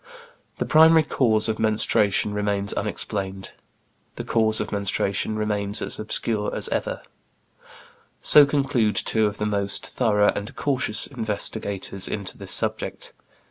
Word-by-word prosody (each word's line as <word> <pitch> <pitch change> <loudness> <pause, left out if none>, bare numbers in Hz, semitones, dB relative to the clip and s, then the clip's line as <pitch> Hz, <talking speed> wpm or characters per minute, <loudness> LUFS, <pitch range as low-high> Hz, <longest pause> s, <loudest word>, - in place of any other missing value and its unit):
"The - - -2
primary 160 +1 +6
cause 115 -7 +2
of 110 -1 -2
menstruation 105 -1 +1
remains 100 -1 0
unexplained"; 95 -1 -4 0.6
"the - - -6
cause 110 -1 +1
of 105 - -4
menstruation 100 +1 -1
remains 105 -1 -2
as - - -2
obscure 110 0 -2
as - - -2
ever"; - - -3 1.2
so 145 -2 +7
conclude 135 -7 0
two 110 -1 +1
of 105 0 -5
the 105 - -2
most 100 -1 -2
thorough 105 -4 +1
and 105 +1 -6
cautious 130 -6 -1
investigators 100 -5 -2
into 100 -3 -3
this - - -5
subject. - - -1
105 Hz, 130 wpm, -23 LUFS, 100-115 Hz, 1.2 s, so